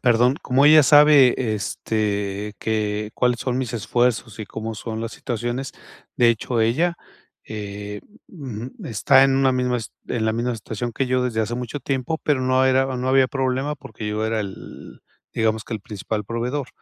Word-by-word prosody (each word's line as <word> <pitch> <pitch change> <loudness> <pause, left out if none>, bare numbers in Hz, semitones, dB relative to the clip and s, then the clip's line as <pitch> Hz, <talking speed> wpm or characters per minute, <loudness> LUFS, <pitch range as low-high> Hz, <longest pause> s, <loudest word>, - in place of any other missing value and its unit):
perdón. 125 +2 +3
Como 130 +2 +2
ella 155 -1 +8
sabe, 145 -2 +7 0.2
este, 105 -1 -2
que 105 -1 -1
cuáles 125 -1 +1
son 125 -1 -1
mis 130 -2 -3
esfuerzos 115 0 0
y 110 - -6
cómo 110 +1 -6
son 110 0 -5
las 115 0 -4
situaciones, 120 +3 -4 0.4
de 120 -1 +5
hecho, 115 +1 0
ella, 160 +11 +1 0.5
eh, 105 -1 -6 0.3
ujú, 130 - -7
está 130 +1 +4
en 135 -1 +3
una 135 -1 +3
misma 125 -1 0 0.3
en 115 -2 -2
la 110 - +1
misma 120 +2 -1
situación 115 +2 -5
que 135 +3 -1
yo 125 0 +1
desde 110 -3 -1
hace 115 +2 -2
mucho 125 +3 -5
tiempo, 135 +4 -2
pero 145 -4 +1
no 130 0 +2
era 130 0 +3
no 125 +1 -2
había 130 0 +5
problema 135 +2 -1
porque 110 -6 -9
yo 105 +1 -2
era 110 0 0
el, 100 -3 -8 0.3
digamos 110 -1 0
que 115 - -5
el 110 - -5
principal 105 0 -5
proveedor. 125 +5 -3
120 Hz, 175 wpm, -22 LUFS, 110-130 Hz, 0.5 s, ella